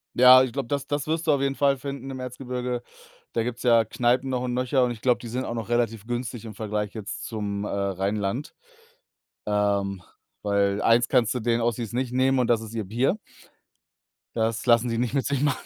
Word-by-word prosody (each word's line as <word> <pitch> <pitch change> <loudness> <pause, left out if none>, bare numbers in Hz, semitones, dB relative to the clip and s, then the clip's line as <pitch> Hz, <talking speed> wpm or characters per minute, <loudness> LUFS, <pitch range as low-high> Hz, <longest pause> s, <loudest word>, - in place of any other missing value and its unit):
Ja, 130 +1 +9
ich 130 -3 -3
glaube, 135 -2 -3
das 140 +1 -2
das 145 0 -2
wirst 160 +1 -1
du 160 - +4
auf 140 -2 +2
jeden 135 0 0
Fall 140 -1 +3
finden 135 0 -6
im 130 - -6
Erzgebirge. 125 -1 -4 0.5
Da 115 - +1
gibt's 120 +1 -4
ja 115 -2 +5
Kneipen 125 +3 +1
noch 125 -1 -1
und 125 -1 -2
nöcher 125 +1 +2
und 125 - +1
ich 115 -2 -8
glaube, 125 -2 +3
die 120 - -8
sind 125 +3 -3
auch 120 - -4
noch 115 -1 -5
relativ 115 -3 0
günstig 120 -1 -4
im 110 - -7
Vergleich 105 0 -3
jetzt 110 -1 -6
zum, 105 -2 -3
äh, - - -4
Rheinland. 100 +5 -2 0.9
Ähm, 100 -2 0 0.4
weil 100 0 +1
eins 120 +1 +4
kannst 115 -2 +3
du - - 0
denen 120 +1 +1
Ossis 115 -1 -1
nicht 125 0 -2
nehmen 130 +1 +3
und 125 - +3
das 115 -2 +2
ist 110 0 -8
ihr 110 - -1
Bier. 120 - +1 1.2
Das 115 0 0
lassen 120 0 +4
sie 115 - -1
nicht 120 +1 -1
mit 135 -2 0
sich 140 -2 0
machen. 145 -2 +1
120 Hz, 215 wpm, -25 LUFS, 110-130 Hz, 1.2 s, Ja